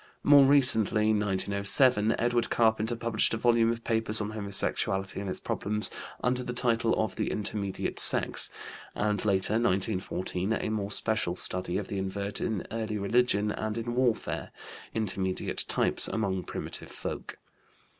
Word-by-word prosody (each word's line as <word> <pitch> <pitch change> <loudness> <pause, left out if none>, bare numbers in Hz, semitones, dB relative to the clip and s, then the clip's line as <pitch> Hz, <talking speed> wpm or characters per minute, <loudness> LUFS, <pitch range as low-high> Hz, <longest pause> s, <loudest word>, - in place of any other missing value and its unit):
More 145 -1 +7
recently 110 -6 +4
(1907) 105 +3 +2
Edward 120 0 0
Carpenter 110 0 +1
published 115 -1 0
a - - -3
volume 115 0 +2
of 115 0 -6
papers 110 -1 +1
on 105 0 -4
homosexuality 100 -2 -1
and 100 - -5
its - - -3
problems, 105 +1 0 0.3
under 125 +1 +1
the 125 -1 -5
title 115 -2 +1
of 110 - -2
The - - -1
Intermediate 100 -2 -2
Sex, - - +6 0.5
and 105 0 0
later 100 -1 0
(1914) 95 -2 -1
a 110 - -2
more 105 -2 -3
special 105 -4 -1
study 90 0 +1
of 100 - -4
the 100 - -4
invert 100 +1 -4
in 110 -5 -3
early 110 -1 -3
religion 105 0 +1
and 110 +1 -4
in 120 +1 -4
warfare, 125 -2 -1 0.5
Intermediate 95 -4 -1
Types - - 0
among 95 -4 -2
Primitive - - -6
Folk. - - -7
110 Hz, 145 wpm, -28 LUFS, 100-115 Hz, 0.5 s, More